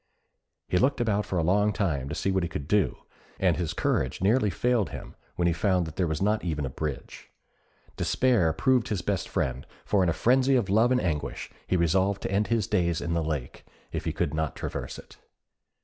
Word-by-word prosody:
He 90 - +1
looked 130 +5 +2
about 105 -3 0
for 95 - -2
a 85 - +1
long 100 +5 +3
time 75 -11 -1
to - - -4
see 95 - 0
what 95 0 +1
he 85 - -2
could 70 - -5
do, 95 -7 +1 0.4
and 90 -4 +3
his 85 -3 -2
courage 65 - 0
nearly 105 +3 +3
failed 115 +3 +1
him - - -9 0.2
when 85 - 0
he 85 - +2
found 90 +1 +1
that 80 -1 -8
there 90 -2 +1
was 80 +3 -1
not 105 +2 +1
even 75 -5 -2
a 65 - -4
bridge. 75 -1 -6 0.7
Despair 120 -11 +2
proved 130 +5 +2
his 100 -6 -2
best - - -2
friend, 65 0 -1 0.2
for 100 - +2
in 90 - +3
a - - +1
frenzy 130 - +3
of 105 -7 +1
love 115 +4 +4
and 125 - +3
anguish, 75 - -3 0.2
he 90 - +2
resolved 95 +4 +1
to - - -2
end 100 +2 +1
his 115 -3 +1
days 85 -3 +1
in 85 - -2
the 85 -1 0
lake, 75 -5 -4 0.3
if - - -4
he - - 0
could 70 - -1
not 80 -1 -2
traverse - - -5
it. - - -14
90 Hz, 215 wpm, -27 LUFS, 80-105 Hz, 0.7 s, love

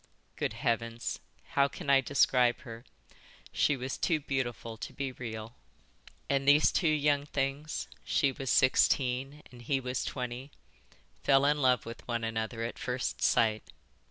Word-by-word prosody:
Good - - -2
Heavens, 115 0 -2 0.3
how 140 0 +3
can 160 +3 -9
I 135 -1 +5
describe 125 -3 +3
her? 115 -1 -10 0.7
She 145 - +2
was 130 +1 -4
too 165 -3 +1
beautiful 120 -5 -3
to - - -7
be 135 -1 -4
real." 115 -2 -7 0.7
"And 140 0 0
these 145 +2 +6
two 170 - +1
young 145 -1 +2
things, 140 +2 -2 0.2
she 140 - +2
was 135 -1 -5
sixteen 130 +3 +2
and 120 -1 -13
he 135 +3 0
was 125 -1 -3
twenty, 125 +1 -5 0.7
fell 135 0 +4
in 150 0 +2
love 125 -3 +3
with 115 +1 -9
one 120 -1 -2
another 115 +1 -3
at 115 - -5
first 125 +1 -3
sight. 110 -2 +3
130 Hz, 150 wpm, -30 LUFS, 120-140 Hz, 0.7 s, these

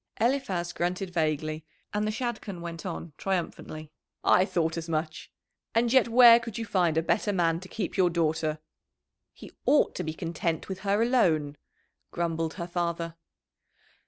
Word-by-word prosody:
Eliphaz 220 -8 0
grunted 180 +2 -2
vaguely, 155 -2 -1 0.3
and 210 +1 0
the - - 0
Shadchan 220 -5 -4
went 170 +1 -6
on 170 -2 -6
triumphantly. 160 -4 -3 0.3
"I 185 - +5
thought 165 -3 0
as 165 0 -5
much. 155 -1 -3 0.4
And 235 +1 +3
yet 260 -3 +5
where 235 0 +8
could 230 -2 -7
you 230 - -3
find 175 -6 +1
a 160 - +2
better 205 +5 +1
man 165 -4 +1
to 185 +1 -12
keep 205 -5 -4
your 185 -2 +4
daughter?" 160 -2 0 0.7
"He - - -13 0.2
ought 295 - +4
to - - -4
be 155 0 -4
content 165 -1 -2
with 190 -1 -5
her 200 +2 +1
alone," 160 - +2 0.6
grumbled 165 -2 -2
her 170 -2 -4
father. 170 -1 -2
175 Hz, 160 wpm, -28 LUFS, 160-205 Hz, 0.7 s, where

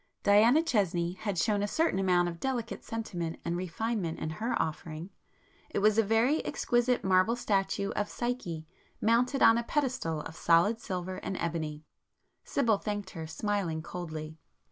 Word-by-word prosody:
Diana 225 +10 +6
Chesney 180 - +1
had 195 0 -4
shown 205 +4 +2
a 205 - 0
certain 320 - +1
amount 180 -2 +3
of 170 -1 -5
delicate 245 -4 -3
sentiment 175 -8 -4
and 170 - -1
refinement 185 0 -2
in 155 - -3
her 220 +9 -2
offering,—it 160 +3 -7
was 215 +2 +4
a - - +5
very 225 +8 +2
exquisite 245 0 +1
marble 190 +4 +3
statue 200 -3 0
of 205 - -2
Psyche, 240 -10 -3 0.3
mounted 245 +5 +2
on 225 +1 +7
a - - -2
pedestal 240 - -1
of 160 - -8
solid 175 +6 +3
silver 185 0 -4
and 190 - -4
ebony. 155 -3 -3 0.6
Sibyl 230 -7 +1
thanked 205 -2 -4
her, 160 -2 -6
smiling 170 -2 -2
coldly. 160 -3 -6
195 Hz, 150 wpm, -30 LUFS, 170-225 Hz, 0.6 s, on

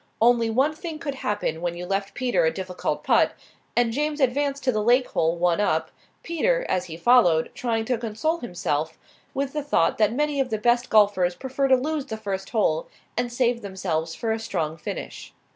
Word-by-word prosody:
Only 235 0 +4
one 265 +7 +2
thing 320 0 -6
could 300 -3 -4
happen 205 -10 -2
when 175 0 -2
you 175 - -5
left 195 +1 -2
Peter 250 -6 +1
a 160 - +3
difficult 185 -1 -3
putt; - - +3 0.4
and 235 -1 +2
James 300 +3 -1
advanced 280 +1 +1
to 255 - +3
the 215 -3 0
lake 245 +4 +4
hole 165 +1 +1
one 175 +2 +1
up, 160 -5 0 0.3
Peter, - - 0
as 185 0 0
he 160 -1 -8
followed, 175 -7 +4
trying 225 -2 -1
to 245 -1 0
console 235 +9 -1
himself 160 - -2 0.4
with 275 0 -2
the 300 - -1
thought 290 -4 +1
that 215 -1 +4
many 295 +3 0
of 265 -2 +1
the 220 - -1
best 240 +3 +2
golfers 200 -4 +4
prefer 265 +3 -1
to 265 - +6
lose 290 +2 -2
the 220 - -4
first 195 -3 -4
hole 165 -8 +1 0.3
and 245 +1 -1
save 240 -1 +1
themselves 175 -5 -3
for 225 - -2
a 220 - -1
strong 170 -8 -2
finish. 160 - -7
225 Hz, 195 wpm, -24 LUFS, 185-265 Hz, 0.4 s, to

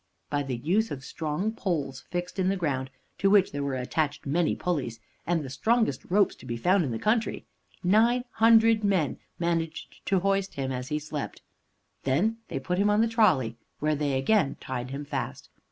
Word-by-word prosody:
By 145 0 +1
the 135 -3 -3
use 195 - +1
of 135 -1 -6
strong 160 +7 -2
poles 155 - -3
fixed 180 +1 -4
in 185 0 +2
the 195 - +1
ground, 135 -7 -1 0.3
to 195 - +3
which 195 -1 +4
were 140 -1 -2
attached 140 +4 -1
many 160 +4 +1
pulleys, 140 -10 -2 0.3
and 170 -2 +1
the - - -6
strongest 225 - +1
ropes 200 +2 +3
to - - -13
be 120 -1 -3
found 180 +9 +3
in 140 - -2
the 115 - -2
country, 220 - 0 0.4
nine 225 +7 +4
hundred 225 -1 +5
men 190 -8 +1 0.2
managed 165 -2 -2
to 190 -2 +2
hoist 195 0 0
him 135 -1 -2
as 125 0 -4
he 150 0 -1
slept. 150 -1 -5 0.6
They 150 +12 +2 0.2
then - - -3
put 180 0 -1
him 205 +1 +3
on 210 +1 +4
the 230 - +3
trolley, 170 - +2 0.2
where 155 +1 +1
they 145 -2 0
again 160 +3 +2
tied 125 -1 -4
him 140 +2 -5
fast. - - -4
170 Hz, 185 wpm, -27 LUFS, 140-200 Hz, 0.6 s, hundred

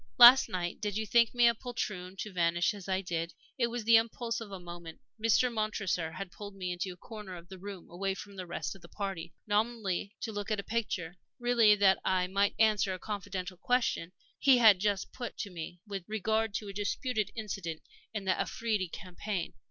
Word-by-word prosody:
"Last 250 +2 +10
night 175 -1 -3
did 210 -1 -1
you 220 - -1
think 235 +2 +4
me 240 -1 +6
a 235 - +5
poltroon 210 -6 -4
to 210 - -6
vanish 170 +2 +2
as 200 -2 -9
I 190 0 +1
did? 170 -2 -3 0.2
It 235 - +3
was 240 -1 -4
the 230 +1 +7
impulse 230 +1 -1
of 225 - -7
a 195 - -6
moment. 175 -2 -9 0.2
Mr. 235 +2 +4
Montresor 195 -6 -1
had 185 +2 -6
pulled 205 +1 -9
me 180 -2 -3
into 180 +1 -3
a 180 - -11
corner 210 -3 -8
of 175 0 -12
the 190 -1 -9
room, 195 -2 -8
away 195 +2 -2
from 200 0 -9
the 185 -2 -6
rest 170 - -3
of 195 - -15
the 170 - -14
party, 195 -5 -4
nominally 210 -2 0
to 225 - -3
look 205 0 -4
at 215 -2 0
a - - -3
picture, 185 -7 -2 0.2
really 235 -4 +5
that 195 -2 +4
I 185 -1 +2
might 200 +2 +1
answer 210 -3 +3
a - - -9
confidential 195 -3 -5
question 240 -7 0 0.3
he 270 -3 +6
had 220 -6 +7
just 200 -1 0
put 240 -2 -6
to 200 - -4
me 175 0 -7
with 200 -3 -5
regard 220 0 0
to 210 - -3
a 200 - -6
disputed 215 +2 -1
incident 195 -7 -4 0.3
in 210 -3 -4
the 190 - +3
Afridi 215 -5 -1
campaign. 185 +1 -4
200 Hz, 205 wpm, -31 LUFS, 180-220 Hz, 0.3 s, Last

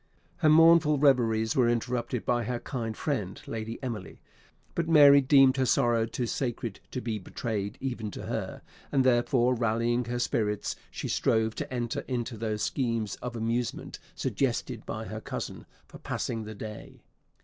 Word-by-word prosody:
Her 155 - +3
mournful 160 -1 +6
reveries 115 -6 +3
were 125 -3 +4
interrupted 120 0 -1
by 120 -2 +1
her 120 +1 -2
kind 115 -5 -4
friend 105 - -2
Lady 115 0 -5
Emily; 115 -7 -5 0.5
but 170 -1 -1
Mary 145 -3 +8
deemed 135 -1 +5
her 130 - +2
sorrow 120 -3 +2
too 120 +2 -3
sacred 120 -4 -3
to 125 - -4
be 110 -3 -3
betrayed 105 +2 -4
even 120 -5 -3
to - - -8
her, - - -4 0.3
and 135 -2 +3
therefore 125 0 +3
rallying 115 +1 0
her 120 +1 -3
spirits, 105 -4 -1
she - - -5
strove 110 0 +1
to - - -5
enter 120 -2 -2
into 120 -2 -3
those 110 -1 -2
schemes 115 -5 -1
of 125 -1 -6
amusement 115 +1 -2 0.2
suggested - - -2
by - - -4
her - - -6
cousin - - -6 0.2
for - - -13
passing 115 -2 -3
the 110 0 -7
day. 105 +1 -9
120 Hz, 160 wpm, -28 LUFS, 110-130 Hz, 0.5 s, Mary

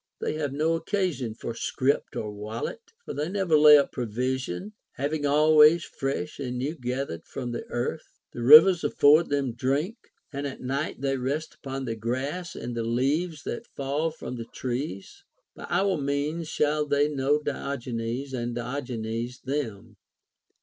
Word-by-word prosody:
They - - -2
have 155 -3 -2
no 155 +4 +1
occasion 165 - -1
for 115 - -5
scrip 130 +4 0
or 105 - -3
wallet, 110 - -5 0.2
for - - -5
tuey 150 +4 -2
never 190 -5 +2
lay 150 0 +9
up 140 - +1
provision, 125 - -3 0.2
having 145 +1 -1
always 155 +2 +6
fresh 140 +3 -4
and 125 -3 -3
new 135 +5 -2
gath 130 -1 -3
ered 85 - -8
from 125 -2 -5
the 120 - -5
earth. 120 +6 -4 0.2
The 120 - -6
rivers 160 +7 +9
afford 150 +2 +5
them 140 -4 0
drink, 140 - -1 0.4
and 140 +1 -3
at 135 - -7
night 135 +2 -3
they 135 -1 0
rest 140 +5 -2
upon 135 -1 -6
the 115 -2 -3
grass 130 +10 -3
and 120 - -5
the 115 - -1
leaves 140 +7 0
that - - -5
fall 140 +4 -2
from 155 -5 -7
the 115 - -5
trees. 120 -5 -5 0.3
By - - -9
our 195 -2 +2
means 145 +3 -2
shall 150 0 +1
they 145 0 +3
know 145 0 +1
Diogenes, 130 -3 -4
and 120 -1 -3
Diogenes 120 -2 -4
them. 115 -6 -4
140 Hz, 160 wpm, -27 LUFS, 120-150 Hz, 0.4 s, lay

